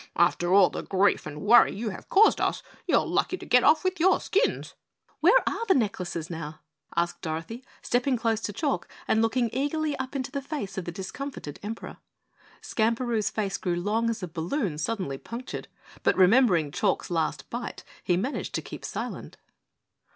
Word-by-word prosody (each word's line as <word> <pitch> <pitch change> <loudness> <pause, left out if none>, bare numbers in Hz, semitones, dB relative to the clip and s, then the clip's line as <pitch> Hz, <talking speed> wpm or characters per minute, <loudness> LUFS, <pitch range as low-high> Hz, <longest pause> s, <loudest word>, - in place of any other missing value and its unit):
"After 175 +1 +2
all 195 -1 +6
the - - -4
grief 195 -2 +1
and 150 0 -7
worry 220 0 +6
you 220 +2 -3
have - - -10
caused 420 +3 +5
us, - - 0 0.2
you - - +4
are - - +1
lucky 370 - 0
to - - -10
get 250 0 +4
off 310 +3 +5
with 370 -1 -1
your 370 +4 +4
skins." 420 +6 0 0.5
"Where 430 +10 +5
are - - -1
the 380 - +5
necklaces 190 - -1
now?" 160 -2 -7 0.3
asked 170 +1 0
Dorothy, 165 +10 -5 0.2
stepping 250 +1 +1
close 225 -1 0
to 210 - -3
Chalk 280 +6 -1 0.2
and 220 - +3
looking 230 0 +1
eagerly 295 +2 -1
up 265 +1 -5
into 265 0 -3
the 280 - -3
face 275 -9 -5
of 190 - -4
the 175 - -4
discomfited 190 - -7
Emperor. 220 +2 -6 0.7
Skamperoo's 230 -1 0
face 200 -3 -2
grew 175 -2 -1
long 215 +6 0
as 220 -4 -3
a - - -2
balloon 170 - -2
suddenly 180 -7 -2
punctured, 240 +2 -7 0.3
but - - +2
remembering 185 - +5
Chalk's - - 0
last 160 -4 -1
bite, 240 +1 -5 0.2
he 175 - +2
managed 255 +10 -3
to - - -2
keep - - -9
silent. - - -5
220 Hz, 180 wpm, -27 LUFS, 175-265 Hz, 0.7 s, all